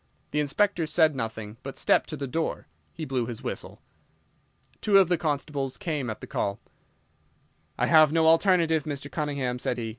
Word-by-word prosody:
The 150 - 0
Inspector 170 +5 +1
said 155 -2 +3
nothing, 110 -3 -5
but, 135 - -8
stepping - - +3
to 155 - -6
the 140 - -3
door, 160 +5 -3 0.3
he 160 - -6
blew 130 -4 -1
his 120 -3 -7
whistle. - - -6 1.0
Two 205 -2 +4
of 190 -3 +5
his 175 -2 +1
constables 145 -4 -2
came 150 -7 -3
at 110 - -6
the - - -6
call. 100 0 -2 1.2
"I - - +2
have 155 -2 +6
no 160 0 +3
alternative, 165 -2 +4
Mr. 145 -1 -5
Cunningham," 140 -5 -2
said 125 - -2
he. 115 -2 -3
150 Hz, 175 wpm, -26 LUFS, 130-160 Hz, 1.2 s, have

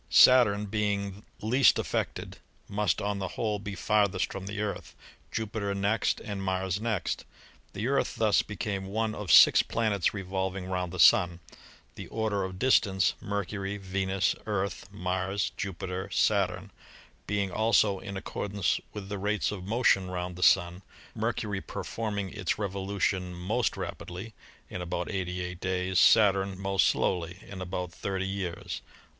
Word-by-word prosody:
Saturn 110 -5 +6
being 100 -1 -2 0.2
least 125 +5 +5
affected, - - -3 0.3
must 100 -4 0
on 100 -1 -1
the 95 - -2
whole 105 -3 0
be 100 -1 -6
farthest 100 -1 +1
from 95 0 -6
the 100 +1 -4
Earth, 105 -1 -4 0.4
Jupiter 105 -2 -2
next 100 +2 +1
and 100 -2 -5
Mars 95 0 -1
next. 110 -4 -1 0.5
The 105 +4 -2
Earth 140 +1 +1
thus 110 -2 +3
became 100 -1 -4
one 110 +2 -1
of 105 -4 -3
six - - +9
planets 110 -5 0
revolving 95 -1 -3
round 90 -2 -2
the - - -6
Sun, 85 -1 +5 0.5
the - - -8
order 110 -3 -1
of 95 -1 -5
distance 95 -6 +3
— - - -29
Mercury, 100 0 -3
Venus, 95 0 0
Earth, 100 -3 -2
Mars, 95 0 -1
Jupiter, 95 -1 -4
Saturn - - +1 0.3
— - - -27
being 100 -1 0
also 105 -2 +3
in 100 0 -6
accordance 100 -1 -1
with 105 -2 -6
the 100 0 -4
rates 105 +2 0
of 95 -3 -6
motion 100 -4 +2
round 90 0 -4
the 90 - -9
Sun, 90 -1 +4 0.3
Mercury 110 -3 -2
performing 105 -4 -4
its 105 -5 -1
revolution 95 -2 -2
most 105 +8 -1
rapidly 95 +6 -6 0.3
(in 90 - -6
about 90 +1 -3
88 90 -2 -3
days), 95 0 0
Saturn 95 -3 +4
most 95 0 +2
slowly 90 -1 0
(in 95 -2 -8
about 90 -1 -4
30 95 +1 -3
years)." 95 -3 -4
100 Hz, 145 wpm, -29 LUFS, 95-105 Hz, 0.5 s, six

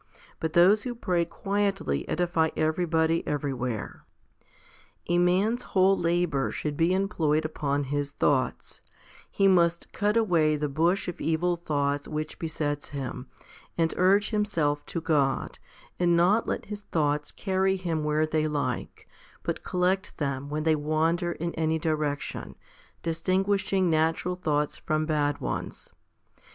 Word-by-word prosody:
But 160 -1 -2
those 190 +5 +6
who 245 -2 -4
pray 180 -7 0
quietly 195 - -1
edify 170 -1 +1
everybody 160 0 +1
everywhere. 130 -6 -3 1.0
A 175 0 +2
man's 195 +7 +2 0.2
whole 190 +1 +6
labour 170 -6 0
should 150 -1 -3
be 165 +4 +2
employed 165 -6 +1
upon 145 -2 -1
his 145 +1 -2
thoughts; 140 -2 -1 0.5
he 195 - +2
must 170 -2 +2
cut 210 +2 +1
away 165 -9 +3
the 150 0 -1
bush 165 +8 +1
of 175 - -5
evil 170 +2 +1
thoughts 145 -4 -1
which 155 0 -4
besets 150 -3 -3
him, 130 -2 -5 0.5
and 165 -1 +1
urge 200 +4 +3
him 210 -1 +2
self 150 -8 0
to 170 - -3
God, 145 -5 0 0.4
and 175 -1 +3
not 195 +7 +3
let - - -2
his 205 0 -7
thoughts 150 -5 -1
carry 190 -1 0
him 170 -4 -2
where 150 +1 +2
they 155 0 0
like, 145 -5 -3 0.4
but - - -3
collect 185 +2 0
them 140 -1 -3
when 150 +1 -2
they 160 0 +3
wander 160 +3 0
in 170 +1 -4
any 160 0 0
direction, 150 -2 -2 0.5
distinguishing 190 +3 +1
natural 165 +2 +1
thoughts 150 -5 -1
from 155 0 -1
bad 150 -2 0
ones. - - -5
160 Hz, 140 wpm, -27 LUFS, 150-180 Hz, 1.0 s, those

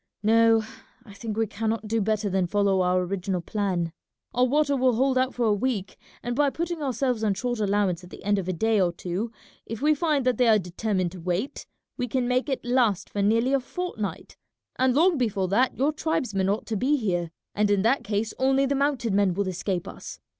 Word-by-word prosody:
No, 225 +1 +5 0.4
I 205 - -13
think 215 +1 -6
we 225 - +2
cannot 220 +1 -3
do 225 +1 0
better 215 +1 0
than 190 -2 0
follow 200 0 +2
our 180 0 +2
original 185 0 -2
plan. 175 -3 -2 0.4
Our 250 +1 +3
water 285 +2 +2
will 255 -2 +2
hold 265 +2 +2
out 255 0 +1
for 245 - 0
a 215 - +3
week, 205 -2 -2 0.3
and 240 0 -2
by 290 +1 +3
putting 335 +2 -3
ourselves 255 -3 -1
on 205 -3 +2
short 240 +2 -2
allowance 200 -4 +1
at 180 - -12
the - - -12
end 205 0 +2
of 185 - -5
a - - +1
day 215 +4 +1
or 175 -2 +2
two 185 +6 -4 0.4
if 225 -1 -5
we 300 +3 +3
find 300 -3 0
that 255 -1 +2
they 250 - +4
are 220 -1 +6
determined 185 0 -2
to 185 - -10
wait, 180 +9 -3 0.3
we 250 -2 -2
can 250 +1 -1
make 255 +3 0
it 265 -3 -2
last 240 -6 +1
for 205 - -2
nearly 230 +6 +2
a 275 - +4
fortnight, 255 - -5 0.4
and 255 -1 +2
long 330 0 +4
before 200 -6 0
that 245 +7 +2
your 285 +4 +2
tribesmen 240 -12 -1
ought 205 +2 -1
to 225 - -3
be 270 +8 +2
here, 175 -8 -1 0.2
and 210 0 +1
in 200 -1 +2
that 240 +5 +2
case 210 +1 -2
only 270 +1 +3
the 275 - 0
mounted 275 -6 0
men 195 -3 +2
will 200 0 -1
escape 185 0 -2
us. - - -9
220 Hz, 220 wpm, -26 LUFS, 195-255 Hz, 0.4 s, are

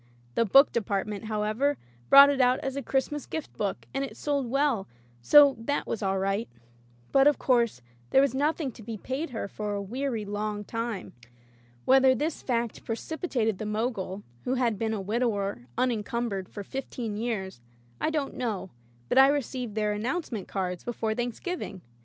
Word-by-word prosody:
The 230 - +2
book 270 +8 +6
department, 205 -1 -2
how 215 -1 -1
ever, 260 +7 +1 0.3
brought 280 +1 +10
it 275 -2 +1
out 250 0 +4
as 270 0 -3
a 280 - -2
Christmas 275 +3 -1
gift 315 -2 -5
book, 200 -2 -3
and 270 - -1
it 275 - -6
sold 280 -4 -1
well, 270 -6 +1 0.3
so 285 - +7
that 285 +6 -1
was 225 - -3
all 195 -1 0
right. 195 +4 -1 0.6
But, 275 +1 +6
of 295 - +4
course, 235 - +1 0.3
there - - +5
was 275 -1 +3
nothing 290 +1 0
to 230 - -14
be 220 0 -6
paid 265 +9 -4
her 225 -5 -4
for 210 0 -4
a - - -2
weary 230 +2 -3
long 205 0 -3
time. 230 -2 -4 0.7
Whether 265 0 +6
this 300 +5 -2
fact 235 -3 -2
pre 225 - -2
cipitated 240 - -2
the 215 - -3
Mogul 210 -3 -2
— 120 - -31
^who 255 +1 +1
had 235 -5 +1
been 220 -1 0
a - - -3
wid 210 +5 -2
ower 200 - -1
unencumbered 230 -4 -1
for 205 - -7
fifteen 240 -2 -5
years 205 - -3 0.2
— 120 0 -27
I - - +2
don't 300 -3 -2
know, 215 -7 -3 0.4
but 260 - +4
I 270 - +9
received 260 -5 -2
their 210 -1 +1
"announce 260 +12 -2
ment" 210 -5 -4
cards 180 -2 -3
before 225 -2 -2
Thanksgiving. 240 - -4
230 Hz, 185 wpm, -28 LUFS, 205-270 Hz, 0.7 s, brought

